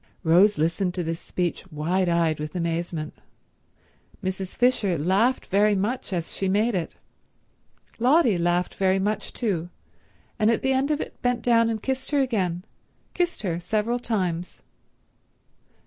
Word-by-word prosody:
Rose 185 Hz, +5 st, +5 dB
listened 170 Hz, +4 st, 0 dB
to 180 Hz, -, -1 dB
this 165 Hz, 0 st, -3 dB
speech 180 Hz, +1 st, -3 dB
wide 175 Hz, +5 st, 0 dB
eyed 165 Hz, -3 st, +1 dB
with 150 Hz, +2 st, -5 dB
amazement. 170 Hz, -2 st, -2 dB, 1.1 s
Mrs. 190 Hz, 0 st, -4 dB
Fisher 225 Hz, -8 st, +2 dB
laughed 195 Hz, -, +2 dB
very 205 Hz, +2 st, +3 dB
much 215 Hz, +5 st, -2 dB
as 170 Hz, -3 st, -3 dB
she 195 Hz, -, -1 dB
made 215 Hz, +5 st, +2 dB
it. 175 Hz, -4 st, -3 dB, 1.0 s
Lotty 255 Hz, -, +4 dB
laughed 175 Hz, +1 st, +1 dB
very 190 Hz, 0 st, +2 dB
much 205 Hz, +2 st, -1 dB
too, 180 Hz, -8 st, -2 dB, 0.7 s
and 215 Hz, -, +4 dB
at 230 Hz, -, +1 dB
the 265 Hz, 0 st, +2 dB
end 265 Hz, +2 st, +1 dB
of 300 Hz, 0 st, 0 dB
it -, -, -8 dB
bent 245 Hz, -1 st, 0 dB
down 230 Hz, -1 st, +4 dB
and 220 Hz, -2 st, -3 dB
kissed 265 Hz, 0 st, -2 dB
her 290 Hz, -, +2 dB
again—kissed 220 Hz, -, -3 dB
her 170 Hz, -4 st, -1 dB
several 215 Hz, +6 st, -1 dB
times. 185 Hz, -7 st, -2 dB
190 Hz, 145 wpm, -25 LUFS, 175-230 Hz, 1.1 s, Rose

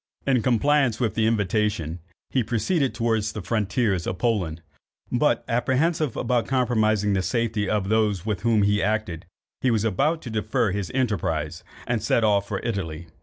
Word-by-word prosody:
In 130 Hz, -3 st, +3 dB
compliance 130 Hz, 0 st, +2 dB
with 115 Hz, -6 st, 0 dB
the 110 Hz, -1 st, +1 dB
invitation, 105 Hz, -6 st, 0 dB, 0.3 s
he 130 Hz, -, +2 dB
proceeded 130 Hz, -, 0 dB
towards 110 Hz, -2 st, 0 dB
the 105 Hz, -, -5 dB
frontiers 105 Hz, -3 st, 0 dB
of 90 Hz, -, -2 dB
Poland; 90 Hz, -7 st, -1 dB, 0.5 s
but -, -, +1 dB
apprehensive 130 Hz, +4 st, 0 dB
of 120 Hz, -2 st, 0 dB
compromising 110 Hz, -5 st, +2 dB
the 95 Hz, -, +1 dB
safety 115 Hz, -2 st, -1 dB
of 105 Hz, -3 st, 0 dB
those 105 Hz, -4 st, +1 dB
with 105 Hz, -4 st, -2 dB
whom 115 Hz, -3 st, +3 dB
he 105 Hz, 0 st, +2 dB
acted, 100 Hz, -6 st, -2 dB, 0.3 s
he 130 Hz, -, +2 dB
was 110 Hz, -3 st, +1 dB
about 140 Hz, -, +1 dB
to 120 Hz, -, -6 dB
defer 110 Hz, 0 st, 0 dB
his 100 Hz, -1 st, -3 dB
enterprise, 85 Hz, -, -1 dB, 0.2 s
and 120 Hz, -3 st, -1 dB
set 115 Hz, +2 st, +2 dB
off 100 Hz, -2 st, +2 dB
for 100 Hz, -, -2 dB
Italy. 85 Hz, -7 st, -4 dB
110 Hz, 165 wpm, -24 LUFS, 100-120 Hz, 0.5 s, In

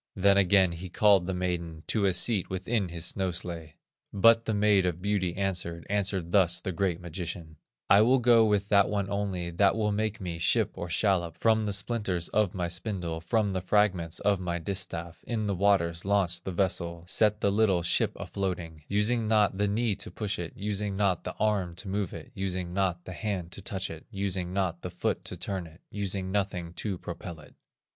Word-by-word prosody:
Then 100 Hz, +1 st, +4 dB
again 95 Hz, -1 st, +5 dB
he 85 Hz, +2 st, -7 dB
called 100 Hz, -1 st, +4 dB
the 95 Hz, -, -1 dB
maiden, 85 Hz, -3 st, -3 dB
To 105 Hz, -2 st, +1 dB
a 95 Hz, -, +3 dB
seat 100 Hz, +1 st, +2 dB
within 95 Hz, +1 st, -1 dB
his 85 Hz, 0 st, -5 dB
snow 95 Hz, +1 st, 0 dB
sledge. 85 Hz, -3 st, -5 dB, 0.4 s
But 115 Hz, +3 st, +5 dB
the 110 Hz, -, 0 dB
Maid 105 Hz, -2 st, +4 dB
or 90 Hz, -, +1 dB
Beauty 90 Hz, 0 st, -1 dB
answered, 90 Hz, -4 st, -2 dB
Answered 95 Hz, -4 st, -1 dB
thus 90 Hz, -3 st, +3 dB
the 95 Hz, -, -4 dB
great 90 Hz, -1 st, -1 dB
magician: 85 Hz, -2 st, -6 dB, 0.3 s
"I 100 Hz, -, +7 dB
will 125 Hz, +4 st, +5 dB
go 120 Hz, -2 st, +5 dB
with 105 Hz, -2 st, +2 dB
that 100 Hz, -1 st, +5 dB
one 100 Hz, -1 st, -1 dB
only 95 Hz, -4 st, -2 dB
That 95 Hz, +5 st, +3 dB
will 105 Hz, -2 st, 0 dB
make 110 Hz, +1 st, -1 dB
me 85 Hz, -4 st, -5 dB
ship -, -, +2 dB
or 85 Hz, -, -6 dB
shallop, 85 Hz, -3 st, +1 dB
From 110 Hz, -1 st, +2 dB
the -, -, 0 dB
splinters 100 Hz, -4 st, -1 dB
of 105 Hz, -3 st, +1 dB
my 90 Hz, -2 st, -1 dB
spindle, 85 Hz, -2 st, -3 dB
From 105 Hz, +3 st, +1 dB
the 95 Hz, -1 st, -2 dB
fragments 90 Hz, -4 st, +1 dB
of 100 Hz, -2 st, +2 dB
my 85 Hz, -2 st, -2 dB
distaff, 85 Hz, -2 st, -4 dB
In 110 Hz, -3 st, -2 dB
the 100 Hz, -, 0 dB
waters 90 Hz, -3 st, +2 dB
launch 95 Hz, -3 st, +1 dB
the 95 Hz, -, -5 dB
vessel, 85 Hz, -2 st, -1 dB
Set 105 Hz, +3 st, +2 dB
the 100 Hz, -, +2 dB
little 100 Hz, -4 st, +2 dB
ship 85 Hz, -, +2 dB
a -, -, -6 dB
floating, 90 Hz, -5 st, -4 dB
Using 110 Hz, +3 st, +1 dB
not 105 Hz, -3 st, +3 dB
the 105 Hz, -, +2 dB
knee 110 Hz, +2 st, +1 dB
to 100 Hz, -, -5 dB
push 105 Hz, -3 st, -3 dB
it, 85 Hz, -2 st, -5 dB
Using 100 Hz, 0 st, -3 dB
not 100 Hz, -4 st, +1 dB
the -, -, -5 dB
arm 100 Hz, -5 st, 0 dB
to 95 Hz, -, -5 dB
move 100 Hz, -1 st, -2 dB
it, 125 Hz, -, -9 dB
Using 95 Hz, -3 st, -3 dB
not 90 Hz, -2 st, -1 dB
the 95 Hz, -, -7 dB
hand 95 Hz, -4 st, -3 dB
to 100 Hz, -, -8 dB
touch 95 Hz, -1 st, -4 dB
it, 80 Hz, -1 st, -10 dB
Using 95 Hz, -4 st, -2 dB
not 90 Hz, -3 st, -1 dB
the 90 Hz, -, -5 dB
foot 90 Hz, 0 st, -2 dB
to 90 Hz, -, -6 dB
turn 90 Hz, 0 st, -4 dB
it, 80 Hz, +2 st, -17 dB
Using 95 Hz, -2 st, -2 dB
nothing 95 Hz, -4 st, -2 dB
to 100 Hz, 0 st, -3 dB
propel 85 Hz, -1 st, -7 dB
it." 75 Hz, -, -16 dB
95 Hz, 205 wpm, -28 LUFS, 85-105 Hz, 0.4 s, I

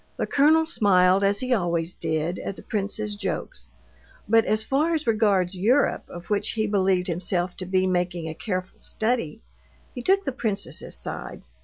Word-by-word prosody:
The -, -, 0 dB
colonel 315 Hz, +3 st, +4 dB
smiled, 195 Hz, -, +3 dB
as 200 Hz, 0 st, +2 dB
he 255 Hz, 0 st, +1 dB
always 170 Hz, -4 st, 0 dB
did, 160 Hz, +2 st, -2 dB
at 195 Hz, -, -5 dB
the -, -, -12 dB
prince's 210 Hz, 0 st, -3 dB
jokes, 195 Hz, -2 st, -5 dB, 0.6 s
but 225 Hz, +1 st, +4 dB
as 215 Hz, +1 st, +1 dB
far 300 Hz, +8 st, +1 dB
as 310 Hz, -1 st, -2 dB
regards 205 Hz, -5 st, +2 dB
Europe, 235 Hz, +10 st, +2 dB
of 175 Hz, +3 st, -10 dB
which 205 Hz, -, 0 dB
he 220 Hz, -1 st, 0 dB
believed 190 Hz, -3 st, +2 dB
himself 175 Hz, 0 st, -2 dB
to 185 Hz, -, -5 dB
be 185 Hz, 0 st, +2 dB
making 175 Hz, -2 st, -1 dB
a 160 Hz, -, -4 dB
careful 185 Hz, +1 st, -4 dB
study, 220 Hz, -9 st, -2 dB, 0.5 s
he 245 Hz, -, -5 dB
took 390 Hz, +8 st, +3 dB
the 270 Hz, -, -2 dB
princess's 220 Hz, -6 st, -4 dB
side. -, -, -7 dB
200 Hz, 170 wpm, -25 LUFS, 180-225 Hz, 0.6 s, colonel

